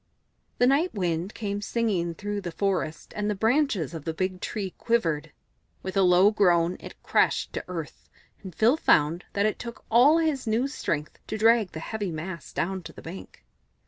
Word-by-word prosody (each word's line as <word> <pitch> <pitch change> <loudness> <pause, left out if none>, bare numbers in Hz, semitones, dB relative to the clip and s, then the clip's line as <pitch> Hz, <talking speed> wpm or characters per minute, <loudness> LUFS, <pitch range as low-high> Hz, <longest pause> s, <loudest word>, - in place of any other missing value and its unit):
The 245 - +4
Night 285 +6 +2
Wind 175 0 -2
came 205 -2 -3
singing 200 -7 -1
through 205 +1 -4
the 175 - -5
forest, 180 -4 -2
and 210 0 -1
the 210 - 0
branches 225 - +1
of 160 -3 -6
the 160 +1 -4
big 185 +1 -2
tree 195 -4 -4
quivered; 165 -10 0 0.5
with 190 +1 -5
a 195 - +4
low 185 +2 +6
groan 175 -4 +3
it - - -10
crashed - - +1
to - - -3
earth, 165 -5 -7 0.3
and 185 -5 -9
Phil 235 +7 +4
found 160 - +3
that 200 +1 +1
it 215 - 0
took 235 -1 -8
all 260 +8 +6
his 310 -7 0
new 225 +5 +1
strength 155 - -3
to 215 - -3
drag 225 -2 +4
the 160 - -5
heavy 205 +1 -4
mass 165 -1 -6
down 190 +2 -2
to - - -10
the - - -12
bank. 170 +4 -10
195 Hz, 185 wpm, -26 LUFS, 170-225 Hz, 0.5 s, low